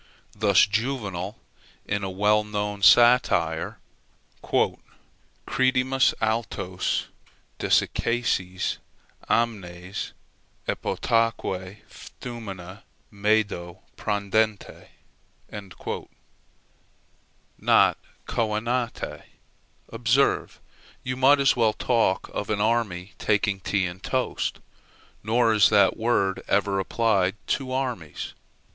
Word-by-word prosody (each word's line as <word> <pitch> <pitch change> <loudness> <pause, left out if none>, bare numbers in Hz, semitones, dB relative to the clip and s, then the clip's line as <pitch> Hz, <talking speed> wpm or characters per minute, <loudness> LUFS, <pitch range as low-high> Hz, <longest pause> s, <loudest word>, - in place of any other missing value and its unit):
Thus 100 -2 +5
Juvenal 105 -3 -3 0.5
in 100 0 -2
a 95 - -2
well 105 +3 +2
known 105 -1 -3
satire 120 +4 +4 0.7
"Credimus 130 0 -1
altos 110 -5 -1 0.5
Desiccasse 95 -6 0 0.5
amnes, 95 -5 -2 0.5
epotaque 105 -4 -1
ftumina, 100 -5 -9 0.3
Medo 100 -4 -1
Prandente." 105 0 -1 2.7
Not - - +4 0.3
coenante, 115 +2 -2 0.7
observe: 115 +4 +1 0.4
you 125 0 -3
might 135 +3 +5
as 135 -1 +4
well 115 -3 +3
talk 115 -6 +1
of 105 - -4
an 110 -1 0
army 105 -5 0
taking 105 -1 +1
tea 95 0 0
and 90 +1 -6
toast. 130 +3 -2 0.6
Nor 115 +1 +2
is 105 -2 +5
that 100 -2 +4
word 110 -4 0
ever 100 -1 +1
applied 95 -2 +1
to 130 -2 -1
armies. 125 - -3
105 Hz, 80 wpm, -25 LUFS, 95-120 Hz, 2.7 s, Thus